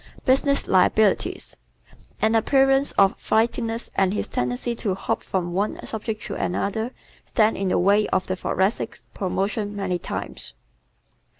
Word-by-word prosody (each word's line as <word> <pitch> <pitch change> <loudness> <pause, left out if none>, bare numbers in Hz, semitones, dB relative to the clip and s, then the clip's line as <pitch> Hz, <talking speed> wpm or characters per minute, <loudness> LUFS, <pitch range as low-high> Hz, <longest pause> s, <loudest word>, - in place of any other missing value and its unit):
Business 280 +2 +4
Liabilities 195 +2 +2 0.4
¶ - - -28 0.3
An 220 +1 +3
appearance 270 +4 +4
of 195 0 +4
flightiness 230 +1 0
and 195 +1 +1
his - - -2
tendency 125 - -2
to 205 -5 -2
hop - - -2
from 175 -2 -3
one 200 +4 -1
subject 220 -1 -4
to - - -5
another, 220 +5 -1 0.3
stand 220 -2 +2
in 195 - -2
the - - +2
way 200 +3 +3
of 185 - 0
the 185 - -2
Thoracic's 190 +3 -1
promotion 205 +2 -2
many 190 -3 -2
times. - - -6
205 Hz, 140 wpm, -23 LUFS, 190-225 Hz, 0.4 s, Business